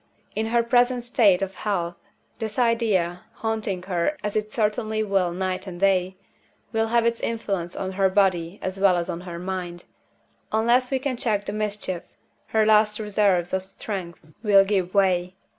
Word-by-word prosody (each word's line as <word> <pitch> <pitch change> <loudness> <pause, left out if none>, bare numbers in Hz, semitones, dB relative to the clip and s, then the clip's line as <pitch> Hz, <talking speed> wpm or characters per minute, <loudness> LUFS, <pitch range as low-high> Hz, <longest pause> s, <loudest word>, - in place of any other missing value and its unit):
In 220 +1 -1
her 235 +1 +2
present 245 +1 +2
state 210 -6 +3
of 195 0 -4
health 175 -5 -2 0.4
this 220 -2 -4
idea 220 -8 +1
(haunting 215 -5 -3
her 185 - -1
as 210 - -3
it 215 0 -1
certainly 215 0 0
will 195 -4 +1
night 185 +1 -3
and 175 -2 -7
day) 190 -1 +2 0.6
will 225 0 +1
have 235 0 +2
its 235 0 +1
influence 195 -6 -3
on 190 -1 -3
her 190 0 +2
body 185 -2 +1
as 190 +1 -3
well 190 -2 +4
as 170 - -2
on 170 - -5
her 175 -2 -7
mind. 180 -1 -5 0.7
Unless 235 +3 +3
we 270 - +1
can 260 -1 -2
check 215 -5 0
the 200 - -4
mischief, 210 -4 -3 0.5
her 220 -1 +2
last 215 0 +4
reserves 200 -4 +1
of 190 - +1
strength 190 -3 -6 0.2
will 200 -3 +5
give 195 -2 -1
way. 185 -2 +2
200 Hz, 170 wpm, -24 LUFS, 185-220 Hz, 0.7 s, will